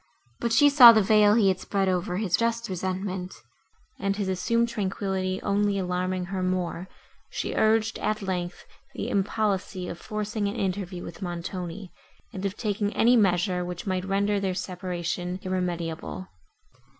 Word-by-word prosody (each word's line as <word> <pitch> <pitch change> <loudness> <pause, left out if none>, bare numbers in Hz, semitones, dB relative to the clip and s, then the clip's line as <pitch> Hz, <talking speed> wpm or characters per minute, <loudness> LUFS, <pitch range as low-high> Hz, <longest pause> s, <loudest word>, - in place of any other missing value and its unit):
But 235 - -1
she 290 +6 +6
saw 270 -5 +10
the 220 -2 +4
veil 210 +1 +5
he 210 -4 +4
had 185 -1 0
spread 195 -2 -1
over 180 0 0
his 205 0 0
resentment, 190 -5 -2 0.6
and, 195 -1 0
his 200 -2 -2
assumed 230 +6 +1
tranquillity 190 -3 -2
only 205 0 +1
alarming 180 0 -1
her 190 - -1
more, 185 -1 -2 0.4
she - - -3
urged, 220 0 +2
at 215 0 -1
length, 180 -2 -4 0.3
the - - -3
impolicy 195 -2 -1
of 170 - -6
forcing 215 0 -3
an 200 - -3
interview 190 -4 -3
with 170 - -9
Montoni, 175 +1 -5 0.4
and 190 - -6
of 195 - -7
taking 205 -2 -1
any 240 +2 +5
measure, 180 -3 +2
which 175 0 -6
might 185 -2 -1
render 200 +1 +1
their 190 -2 -1
separation 180 -1 -4
irremediable. 180 -1 -3
190 Hz, 150 wpm, -26 LUFS, 180-210 Hz, 0.6 s, saw